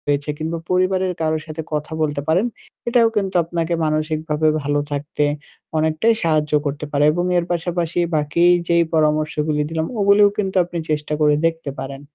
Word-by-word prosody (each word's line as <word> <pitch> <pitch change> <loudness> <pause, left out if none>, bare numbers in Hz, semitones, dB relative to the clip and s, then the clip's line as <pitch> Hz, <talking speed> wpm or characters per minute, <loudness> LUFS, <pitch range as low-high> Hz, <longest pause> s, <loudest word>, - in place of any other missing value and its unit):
রয়েছে 145 0 0
কিংবা 160 +1 -3
পরিবারের 185 0 +1
কারো 160 0 +1
সাথে 160 0 -6
কথা 150 +1 -3
বলতে 145 -2 0
পারেন। 175 +7 +3 0.4
এটাও 235 -1 +4
কিন্তু 195 -2 -1
আপনাকে 165 0 -2
মানসিকভাবে 155 0 0
ভালো 145 +1 0
থাকতে 145 +1 -2 0.5
অনেকটাই 160 +8 +2
সাহায্য 155 -2 +1
করতে 145 +1 -3
পারে 145 0 +2
এবং 175 +3 -1
এর 175 - +1
পাশাপাশি 175 0 -1 0.2
বাকি 150 +3 +1 0.2
যেই 170 0 +4
পরামর্শগুলি 155 -1 +1
দিলাম 160 -1 -1
ওগুলিও 200 +1 +5
কিন্তু 195 -2 -2
আপনি 175 0 -6
চেষ্টা 150 0 -1
করে 150 -1 +5
দেখতে 165 -3 -1
পারেন। 135 0 -6
160 Hz, 160 wpm, -20 LUFS, 150-175 Hz, 0.5 s, ওগুলিও